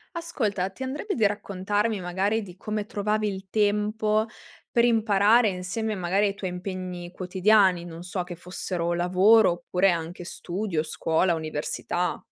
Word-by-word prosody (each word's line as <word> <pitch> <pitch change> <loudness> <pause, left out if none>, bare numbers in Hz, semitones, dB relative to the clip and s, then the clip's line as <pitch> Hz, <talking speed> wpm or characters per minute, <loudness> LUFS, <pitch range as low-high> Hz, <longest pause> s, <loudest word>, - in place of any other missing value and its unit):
Ascolta, 215 - -2
ti 225 - -16
andrebbe 290 +10 -3
di 225 - +2
raccontarmi, 205 +1 -1
magari, 190 +5 0
di 185 -3 -11
come 215 0 -3
trovavi 215 -1 0
il 195 -1 -5
tempo 210 +1 +1 0.5
per 235 - +3
imparare 220 -1 +4
insieme 195 +4 -3
a - - -5
magari, 185 +3 +1
ai 200 - -1
tuoi 195 -2 -4
impegni 180 -1 -6
quotidiani, 185 0 +3
non 165 -1 -9
so, 180 +1 -3
che 175 0 -8
fossero 175 -1 -3
lavoro, 185 +4 +5
oppure 180 +2 +1
anche 170 +1 -4
studio, 175 -1 -3
scuola, 160 +2 +1
università? 160 +3 -3
195 Hz, 145 wpm, -26 LUFS, 180-215 Hz, 0.5 s, lavoro